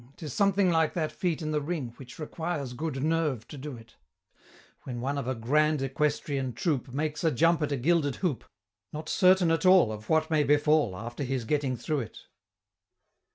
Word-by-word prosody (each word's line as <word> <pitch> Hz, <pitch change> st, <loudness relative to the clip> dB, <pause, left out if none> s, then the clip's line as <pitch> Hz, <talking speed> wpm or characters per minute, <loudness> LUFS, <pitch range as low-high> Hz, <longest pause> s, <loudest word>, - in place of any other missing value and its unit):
'Tis 150 Hz, -5 st, -7 dB
something 195 Hz, -2 st, +3 dB
like 160 Hz, -1 st, +2 dB
that 160 Hz, -3 st, -1 dB
feat 170 Hz, -3 st, -2 dB
in 155 Hz, -, -2 dB
the 150 Hz, -1 st, 0 dB
ring, 145 Hz, -6 st, -4 dB
Which 130 Hz, -2 st, -11 dB
requires 155 Hz, -4 st, -4 dB
good 140 Hz, -1 st, -3 dB
nerve 155 Hz, -7 st, 0 dB
to -, -, -8 dB
do 140 Hz, -2 st, -7 dB
it 115 Hz, -1 st, -17 dB, 0.8 s
When 125 Hz, -2 st, -6 dB
one 135 Hz, +4 st, -2 dB
of 140 Hz, -3 st, -3 dB
a 130 Hz, -, -1 dB
"Grand 150 Hz, +6 st, +2 dB
Equestrian 135 Hz, -1 st, -1 dB
Troop" 145 Hz, -3 st, -1 dB
Makes 150 Hz, +4 st, -2 dB
a 165 Hz, -, +4 dB
jump 165 Hz, +4 st, +3 dB
at 150 Hz, -, -1 dB
a 140 Hz, -, 0 dB
gilded 145 Hz, +1 st, +1 dB
hoop, 170 Hz, -10 st, -2 dB, 0.5 s
Not 155 Hz, +1 st, -6 dB
certain 185 Hz, -3 st, +4 dB
at 165 Hz, -1 st, +1 dB
all 185 Hz, -10 st, +6 dB
Of 110 Hz, 0 st, -8 dB
what 160 Hz, 0 st, +2 dB
may 155 Hz, -2 st, +3 dB
befall 145 Hz, -6 st, +3 dB
After 120 Hz, +5 st, -7 dB
his 130 Hz, -2 st, -2 dB
getting 135 Hz, -1 st, 0 dB
through 150 Hz, +4 st, -2 dB
it! 120 Hz, -, -7 dB
150 Hz, 190 wpm, -28 LUFS, 130-160 Hz, 0.8 s, all